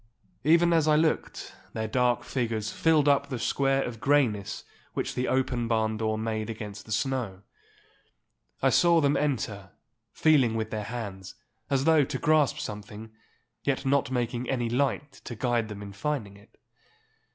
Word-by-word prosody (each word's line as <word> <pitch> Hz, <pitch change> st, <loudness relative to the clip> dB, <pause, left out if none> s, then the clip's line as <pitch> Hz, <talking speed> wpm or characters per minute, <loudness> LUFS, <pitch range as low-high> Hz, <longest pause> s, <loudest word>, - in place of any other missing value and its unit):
Even 170 Hz, +3 st, +4 dB
as 160 Hz, -2 st, +3 dB
I 155 Hz, -, +5 dB
looked, 155 Hz, +1 st, 0 dB, 0.2 s
their 110 Hz, 0 st, -2 dB
dark 125 Hz, +1 st, +1 dB
figures 115 Hz, -4 st, -2 dB
filled 155 Hz, -3 st, +3 dB
up 140 Hz, 0 st, +3 dB
the 130 Hz, -, -3 dB
square 135 Hz, +3 st, +1 dB
of 115 Hz, -2 st, -6 dB
greyness 115 Hz, -9 st, +1 dB, 0.3 s
which -, -, -2 dB
the 125 Hz, -, -1 dB
open 125 Hz, -2 st, 0 dB
barn 110 Hz, -1 st, 0 dB
door 110 Hz, 0 st, -1 dB
made 110 Hz, 0 st, -3 dB
against 105 Hz, -2 st, -7 dB
the -, -, -9 dB
snow. 115 Hz, -7 st, -2 dB, 1.2 s
I -, -, +4 dB
saw 170 Hz, -1 st, +5 dB
them 145 Hz, -2 st, +2 dB
enter, 110 Hz, -9 st, -2 dB, 0.4 s
feeling 135 Hz, -8 st, +3 dB
with 110 Hz, -1 st, -2 dB
their 105 Hz, -1 st, -3 dB
hands, 100 Hz, -5 st, -6 dB, 0.3 s
as 135 Hz, -1 st, +1 dB
though 160 Hz, -1 st, +5 dB
to 135 Hz, 0 st, -3 dB
grasp 150 Hz, -1 st, +3 dB
something, 105 Hz, +1 st, -7 dB, 0.5 s
yet 135 Hz, 0 st, -1 dB
not 135 Hz, -2 st, +2 dB
making 125 Hz, -1 st, -2 dB
any 120 Hz, -3 st, -1 dB
light 140 Hz, +2 st, 0 dB
to 120 Hz, -, -6 dB
guide 120 Hz, -1 st, 0 dB
them 105 Hz, -1 st, -7 dB
in 100 Hz, -1 st, -9 dB
finding 105 Hz, -2 st, -3 dB
it. 100 Hz, -, -20 dB
120 Hz, 160 wpm, -27 LUFS, 110-140 Hz, 1.2 s, I